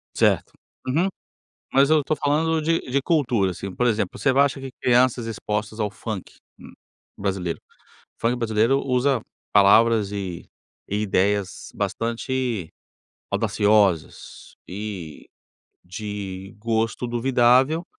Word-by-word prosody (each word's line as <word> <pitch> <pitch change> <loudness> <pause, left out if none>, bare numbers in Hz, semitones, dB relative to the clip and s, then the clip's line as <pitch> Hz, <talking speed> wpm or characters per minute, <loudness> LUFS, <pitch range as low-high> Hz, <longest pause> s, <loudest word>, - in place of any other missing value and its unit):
Certo. - - +2 0.3
Uhum. 165 +9 +2 0.6
Mas 135 +2 +4
eu 155 -1 +5
estou 155 +2 -1
falando 155 +2 +1
de 165 +2 +1
de 135 +2 -1
cultura, 125 - +1
assim. 95 +2 -7
Por 125 - +1
exemplo, 105 -4 -1
você 135 - +3
não 135 +2 +4
acha 140 -1 +1
que 135 -1 -7
crianças 125 -1 +3
expostas 105 -1 -4
ao 105 -1 0
funk, 110 -3 -6 0.3
hum, - - -12 0.5
brasileiro 95 -4 -2 0.6
funk 120 +2 +1
brasileiro 115 +3 +2
usa 130 -1 +1 0.3
palavras 105 +1 +5
e 95 -4 -5 0.4
e 105 +1 0
ideias 100 0 0
bastante 115 - -2 0.6
audaciosas 100 -6 +1
e 95 -5 -7 0.6
de 95 -1 -6
gosto 115 +2 -1
duvidável 130 +6 +3
115 Hz, 115 wpm, -23 LUFS, 100-130 Hz, 0.6 s, eu